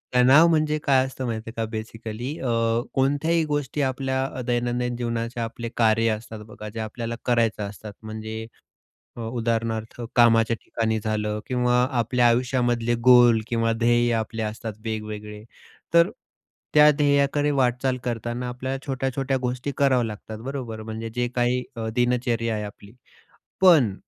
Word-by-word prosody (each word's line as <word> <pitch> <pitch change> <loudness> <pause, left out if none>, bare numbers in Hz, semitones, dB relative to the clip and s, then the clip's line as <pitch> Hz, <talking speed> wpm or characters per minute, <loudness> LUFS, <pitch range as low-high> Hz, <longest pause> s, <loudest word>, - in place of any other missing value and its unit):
तणाव 130 +6 +7
म्हणजे 155 -2 +2
काय 130 -2 +4
असतं 130 0 -6
माहिती 115 -2 -4
आहे - - -9
का - - 0
बेसिकली? 115 +4 -5
अ, 115 -2 +1
कोणत्याही 145 +5 +2
गोष्टी 145 -1 -2
आपल्या 130 0 -1
दैनंदिन 120 0 0
जीवनाचे 115 0 -3
आपले 115 +1 -5
कार्य 115 0 +3
असतात 110 0 -10
बघा, 105 0 -9
जे 110 +2 -7
आपल्याला 115 +2 -4
करायचं 115 -3 +1
असतात. 105 +1 -10
म्हणजे 110 +1 -6 0.7
अ, - - -10
उदाहरणार्थ 115 -1 -2 0.2
कामाच्या 115 -1 +5
ठिकाणी 110 -1 -2
झालं 105 -1 -1
किंवा 125 -1 +1 0.3
आपल्या 120 +1 +3
आयुष्यामधले 120 -1 +1
गोल 120 -3 +7
किंवा 115 -1 +1
ध्येय 120 0 +3
आपले 110 0 -3
असतात 110 +1 -5
वेगवेगळे. 105 -1 -5 0.5
तर 170 +2 +6 0.6
त्या 150 0 +8
ध्येयाकडे 145 0 +2
वाटचाल 130 -1 +1
करताना 120 +1 -3
आपल्याला 130 +2 -4
छोट्या-छोट्या 135 0 -1
गोष्टी 125 +2 -3
कराव्या 130 -3 +3
लागतात, 110 0 -8
बरोबर. 125 -5 -5
म्हणजे 110 +1 -5
जे 125 0 0
काही 125 +1 +1
अ, 115 -1 -4
दिनचर्या 120 -2 +1
आहे 105 - -3
आपली. 105 0 -10 0.7
पण, 155 - +6
120 Hz, 140 wpm, -24 LUFS, 110-130 Hz, 0.7 s, त्या